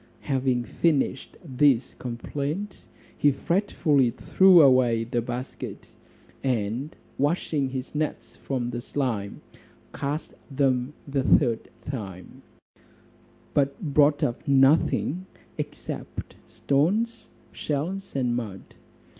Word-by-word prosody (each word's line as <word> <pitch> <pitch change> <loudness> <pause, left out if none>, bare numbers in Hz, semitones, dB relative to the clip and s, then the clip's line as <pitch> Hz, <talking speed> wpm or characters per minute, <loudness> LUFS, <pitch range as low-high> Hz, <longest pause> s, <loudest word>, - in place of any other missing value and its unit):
Having 130 -3 0
finished 145 -4 0
this 135 -3 +2
complaint, 145 - -5 0.3
he 145 - +4
fretfully 150 - +1
threw 185 +9 +5
away 130 -5 +5
the 120 +1 -1
basket, 125 +2 -6 0.5
and 125 +3 -1 0.2
washing 145 -1 0
his 130 0 -5
nets 150 -7 -3
from 125 -3 -3
the 120 0 -4
slime, 120 -7 -3 0.5
cast 145 +3 -3 0.2
them 135 -1 0
the 140 -1 0
third 120 -3 +2 0.2
time; 100 -10 -7 1.1
but 140 -1 +1
brought 145 -2 +3
up 120 +5 -2
nothing, 140 +5 +3 0.3
except - - -6
stones, 195 +12 0 0.2
shells, 180 +6 -3
and 125 -3 +1
mud. 105 -6 -6
135 Hz, 95 wpm, -26 LUFS, 125-150 Hz, 1.1 s, threw